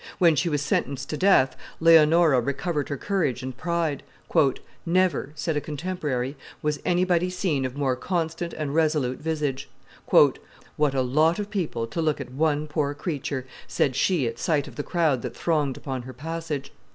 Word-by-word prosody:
When 170 -3 +5
she 170 +4 +1
was 145 -2 0
sentenced 140 -2 -1
to 150 - -2
death, 185 -9 +4 0.2
Leonora 160 -3 +6
recovered 145 +4 -2
her 140 - -2
courage 145 -8 -1
and 130 -1 -5
pride. 170 -1 -1 0.8
"Never," 180 -4 +1
said 155 +1 -2
a 150 - 0
contemporary, 150 -5 -3 0.3
"was 150 -1 0
anybody 180 0 +2
seen 180 -7 -1
of 130 +1 -5
more 135 -3 +1
constant 170 +3 -2
and 145 -2 -3
resolute 150 -5 +1
visage." 150 -4 -2 0.4
"What 150 -2 +2
a 130 - +2
lot 155 +6 +3
of 205 0 -4
people 165 - -2
to 165 +9 -3
look 155 -2 +1
at 130 -3 -7
one 150 +2 +1
poor 145 -1 -1
creature!" 145 -5 -3 0.2
said 130 - 0
she 165 -1 +2
at 115 0 -4
sight 155 -5 +1
of - - -11
the - - -2
crowd 155 -6 +1
that - - -6
thronged 150 -5 0
upon 130 -3 -4
her 130 +2 -9
passage. 160 0 -5
150 Hz, 170 wpm, -25 LUFS, 135-170 Hz, 0.8 s, Leonora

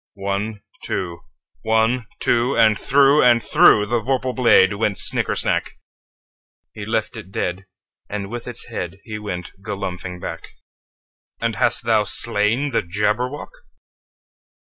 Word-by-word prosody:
One, 100 +1 -3 0.2
two! 85 -3 -4 0.4
One, 110 - +1
two! 120 +3 +1
And 110 -1 +5
through 140 +5 +4
and 120 -1 +5
throughThe 110 +1 +4
vorpal 130 0 -1
blade 115 -6 +5
went 100 -1 -1
snicker - - +1
snack! - - -1 1.0
He 105 -1 -8
left 110 -1 -2
it 105 -4 -10
dead, 90 0 -3 0.4
and 100 0 -5
with 120 0 -6
its 120 -2 -4
headHe 105 +2 -6
went 90 -4 -5
galumphing 95 -3 -5
back."And 85 -1 -9
hast - - +2
thou - - +3
slain 115 +8 +1
the 115 - +1
Jabberwock? 105 +9 -2
105 Hz, 120 wpm, -21 LUFS, 100-120 Hz, 1.0 s, And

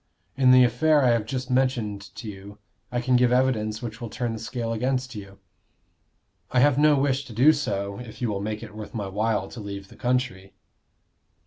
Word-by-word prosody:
In 135 -2 +4
the 130 0 +8
affair 150 +4 +3
I 125 - +5
have 115 -2 0
just 130 +1 -4
mentioned 125 -6 0
to 115 - -8
you 100 0 -9 0.3
I 120 0 -1
can 125 +1 +2
give 125 0 +4
evidence 115 -4 +1
which 115 0 -6
will 120 - -5
turn 120 +1 -3
the 110 - -6
scale 115 0 -3
against 125 +2 -1
you. 100 -3 -9 1.1
I 125 - +2
have 145 +1 +4
no 150 0 +5
wish 135 0 +1
to 120 - -10
do 135 +8 +6
so, 100 -9 -3
if 120 -2 -10
you 125 - -1
will 100 -2 -2
make 105 +1 -4
it - - -10
worth 110 +2 -9
my 105 -3 -2
while 105 0 -1
to 120 - -9
leave 100 -2 -7
the - - -15
country." 125 -7 -2
120 Hz, 205 wpm, -25 LUFS, 105-130 Hz, 1.1 s, the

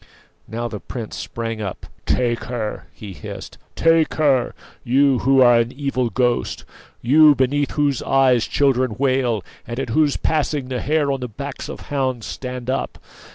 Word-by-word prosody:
Now 120 +2 -3
the 105 -3 -6
prince 115 0 -7
sprang 115 -1 -5
up. 95 -3 -5 0.2
"Take 120 -2 0
her!" 115 -4 -4
he 100 -3 -10
hissed; - - -9 0.2
"take 165 -1 +3
her! 140 -5 +2 0.3
you, 135 +1 +3
who 135 0 +4
are 120 -1 +6
an 115 +1 0
evil 135 -3 -1
ghost; 120 +2 -1 0.4
you, 150 +4 +6
beneath 140 +2 +1
whose 145 -4 +1
eyes 130 -3 +3
children 130 -5 +1
wail, 130 -6 +1 0.2
and 120 +2 -4
at 135 -3 -3
whose 150 +2 +2
passing 150 -4 -1
the 125 -2 -2
hairs 150 -1 +1
on 135 - -2
the 125 - -4
backs 140 +5 -7
of 160 - -7
hounds 130 -5 -2
stand 125 -2 -6
up! 130 +1 -2
130 Hz, 160 wpm, -21 LUFS, 120-140 Hz, 0.4 s, are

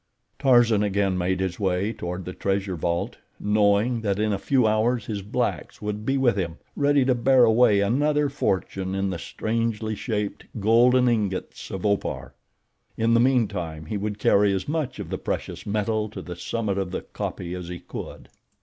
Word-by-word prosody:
Tarzan 120 -6 +4
again 100 -2 +1
made 90 +1 0
his 95 0 -2
way 95 +2 0
toward 90 -1 -5
the 90 - -5
treasure 95 -1 -1
vault, 85 +1 -2 0.2
knowing 105 +3 +2
that 100 -3 0
in 105 0 +1
a 100 - -2
few 130 +2 +2
hours 110 +2 +1
his 105 -3 -4
blacks 100 - -2
would 105 +1 -4
be 135 +1 +2
with 125 -5 +3
him, 85 -4 -3 0.2
ready 145 -2 +3
to 130 - +3
bear 125 +1 +4
away 110 -3 +4
another 145 +7 +2
fortune 95 - -2
in 95 0 -1
the 85 - -4
strangely 110 +2 -2
shaped, 105 -1 -3 0.2
golden 120 +4 +4
ingots 105 -6 -1
of 95 0 -5
Opar. 100 -1 -1 0.6
In 115 +1 +2
the 115 - +5
meantime 100 -11 0
he 105 +7 -3
would 105 +1 -3
carry 100 -1 +4
as 95 - -3
much 150 -2 -2
of - - -7
the - - -2
precious - - -4
metal 105 +1 0
to 100 -3 -8
the 90 - -7
summit 100 +2 -2
of 95 -2 -2
the 95 - -4
kopje 90 -1 -5
as 90 -1 -6
he 90 0 -5
could. - - -8
105 Hz, 180 wpm, -25 LUFS, 95-115 Hz, 0.6 s, the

